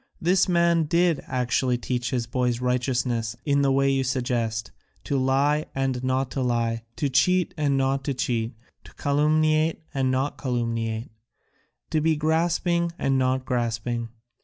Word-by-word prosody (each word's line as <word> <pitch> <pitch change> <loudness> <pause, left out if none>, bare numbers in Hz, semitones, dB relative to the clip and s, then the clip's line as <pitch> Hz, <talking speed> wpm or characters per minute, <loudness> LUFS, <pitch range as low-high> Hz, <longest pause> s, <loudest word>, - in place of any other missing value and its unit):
This 180 +3 +2
man 170 -2 +3
did 170 -1 +2
actually 125 0 0
teach 125 0 -2
his 125 -4 -1
boys 125 0 -1
righteousness 125 -2 -1
in 140 -1 +2
the 140 -1 +3
way 135 0 +3
you 135 -1 +1
suggest, 120 -4 -1 0.3
to 140 - -2
lie 140 +3 +2
and 135 -2 -1
not 130 0 0
to 135 - -2
lie, 115 -2 0
to 145 - 0
cheat 180 +7 +2
and 145 -4 +1
not 135 0 0
to 140 - -1
cheat, 120 -2 -1 0.3
to - - -16
calumniate 155 +2 +2
and 135 -2 +1
not 130 +2 -1
to - - -14
calumniate, 115 -2 -2 0.8
to 155 - +1
be 160 +1 +2
grasping 170 +2 +1
and 135 -1 +1
not 130 0 0
grasping. 120 -1 -2
135 Hz, 155 wpm, -25 LUFS, 125-150 Hz, 0.8 s, man